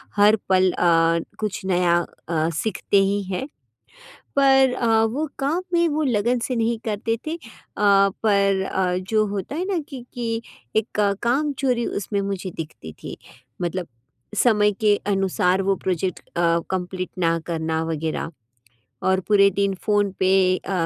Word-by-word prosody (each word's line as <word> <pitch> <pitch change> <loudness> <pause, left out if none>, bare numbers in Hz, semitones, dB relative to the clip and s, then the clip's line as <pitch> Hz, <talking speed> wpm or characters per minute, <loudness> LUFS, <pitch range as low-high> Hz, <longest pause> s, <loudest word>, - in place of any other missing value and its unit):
हर 205 +1 +6
पल 185 -1 +4
अ, 165 -1 +3 0.2
कुछ 210 -2 -3
नया, 180 -2 +2 0.3
अ, 160 -1 +1
सीखते 200 +3 0
ही 200 +1 0
हैं, 190 +7 -3 0.9
पर 270 -2 +5
अ, 245 -2 -1 0.2
वो 275 +8 -2
काम 295 +6 0
में 340 0 +4
वो 305 +1 0
लगन 240 -1 +1
से 250 +2 -2
नहीं 230 0 0
करते 225 +1 -1
थे। 320 - -2
अ, - - -11 0.4
पर 200 -1 +3
अ, 185 -2 0
जो 215 -1 +3
होता 200 +6 -4
है 350 +4 -2
ना 385 -2 -1
कि 260 -5 -8
कि 230 -2 -2 0.3
एक 220 +1 +2
क 200 -1 +3
कामचोरी 260 -1 +1
उसमें 200 0 -2
मुझे 195 -1 -4
दिखती 150 - -7
थी। - - -7 0.4
मतलब 175 0 -2 0.6
समय 210 -3 +4
के 210 -1 +5
अनुसार 195 -2 +1
वो 195 0 +2
प्रोजैक्ट 185 -1 -1
अ, 170 -1 +1
कंप्लीट 185 0 -3
ना 165 -1 +2
करना 160 -1 -1
वगैरह 160 0 -3 0.7
और 190 0 +3
पूरे 200 -1 +5
दिन 200 -1 +1
फ़ोन 205 -2 +2
पे 185 0 +3 0.3
अ, 185 - -7
200 Hz, 155 wpm, -23 LUFS, 185-230 Hz, 0.9 s, हर